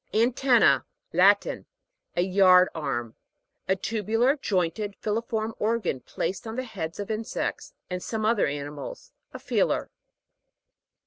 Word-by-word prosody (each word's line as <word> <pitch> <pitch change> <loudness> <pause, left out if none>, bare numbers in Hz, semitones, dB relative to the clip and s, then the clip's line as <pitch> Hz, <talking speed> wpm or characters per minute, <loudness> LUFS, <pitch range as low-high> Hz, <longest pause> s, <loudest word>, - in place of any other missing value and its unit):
ANTEN'NA. 240 +2 +4 0.3
Latin. - - +3 0.5
A 175 - +2
yard 185 -1 +6
arm. 120 -7 -3 0.5
A 190 - +3
tubular, 225 +6 +1
jointed, 205 - -1
filiform 220 +1 -2
organ, 220 - 0
placed 190 - -4
on 220 - -5
the 255 - -2
head 175 -9 -6
of 205 +2 -4
insects, 220 +1 -3
and 180 0 -4
some 220 +2 -3
other 220 -1 +3
animals. 145 0 -6 0.2
A - - -7
feeler. - - 0
210 Hz, 120 wpm, -26 LUFS, 180-225 Hz, 0.5 s, yard